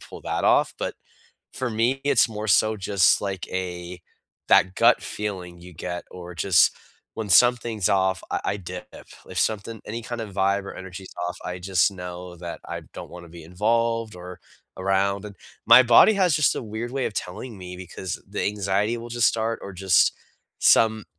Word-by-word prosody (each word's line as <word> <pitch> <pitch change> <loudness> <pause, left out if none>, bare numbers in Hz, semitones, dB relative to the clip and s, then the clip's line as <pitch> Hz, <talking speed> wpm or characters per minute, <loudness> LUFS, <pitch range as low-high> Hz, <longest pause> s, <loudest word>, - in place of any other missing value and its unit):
pull - - -11
that - - -2
off, - - +3
but - - -3 0.6
for 130 -1 -3
me, 115 +5 0
it's 140 -4 +4
more 110 0 -5
so 110 +2 +3
just 100 -2 +3
like 95 -3 -4
a 90 -1 -5 0.5
that 95 0 +4
gut - - +4
feeling 90 -4 -6
you 90 +1 -12
get 90 +2 -5
or 90 -1 -9
just 85 +2 +4 0.4
when 110 -2 -5
something's 115 0 +3
off, 95 -1 +1
I - - -1
I 100 - -1
dip. 90 -1 -8 0.4
If 95 - -5
something 110 +1 -1
any 115 +2 -5
kind 120 +1 -5
of 110 -3 -6
vibe 100 +1 +1
or - - -8
energy's 95 0 -9 0.2
off, 90 - -6
I 90 0 -4
just 90 +1 +2
know 90 -1 -8
that 85 0 -7
I - - -5
don't - - -8
wanna 85 0 -11
be 85 0 -12
involved 115 +5 0
or 90 0 -10 0.4
around, 95 +1 0
and 105 -1 -9 0.3
my 125 - +9
body 120 - +6
has 185 -6 +3
just 150 -2 +2
a - - -3
weird 110 +2 -5
way 135 -1 -1
of - - -5
telling 105 +5 -6
me 90 -1 -8
because 90 0 -6
the 100 - -3
anxiety 100 +2 0
will 115 +1 -8
just 120 0 +3
start 115 0 -1
or 100 - -7
just 95 -1 +3 0.5
some 110 -2 +4
100 Hz, 185 wpm, -24 LUFS, 90-115 Hz, 0.6 s, my